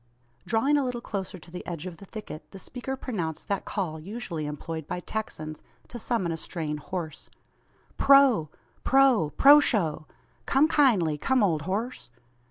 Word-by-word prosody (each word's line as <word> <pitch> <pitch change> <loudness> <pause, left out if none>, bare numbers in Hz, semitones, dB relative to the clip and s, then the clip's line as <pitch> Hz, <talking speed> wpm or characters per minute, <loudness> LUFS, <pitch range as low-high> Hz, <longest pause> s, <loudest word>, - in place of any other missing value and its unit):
Drawing 270 +6 +3
a 285 - +2
little 250 -2 -2
closer 195 -4 -5
to 170 0 -16
the 180 - -7
edge 170 -2 -5
of 180 -3 -7
the 200 - -12
thicket, 210 -8 -9
the 195 - -11
speaker 250 +6 -5
pronounced 175 - -4
that 200 -1 -1
call 170 -6 -3
usually 170 -4 -5
employed 155 +1 -5
by 180 - -3
Texans 155 -6 -5 0.3
to 240 - -7
summon 215 -7 -1
a 165 - -3
straying 155 -2 -4
horse. 160 0 -6 0.7
"Proh 275 - +6 0.4
proh 265 - +4
proshow! 220 - +5 0.4
Come 275 +4 +4
kindly! 200 - +3
come, 260 - +2
old 165 -6 +2
horse!" 205 - -3
190 Hz, 155 wpm, -27 LUFS, 160-245 Hz, 0.7 s, Proh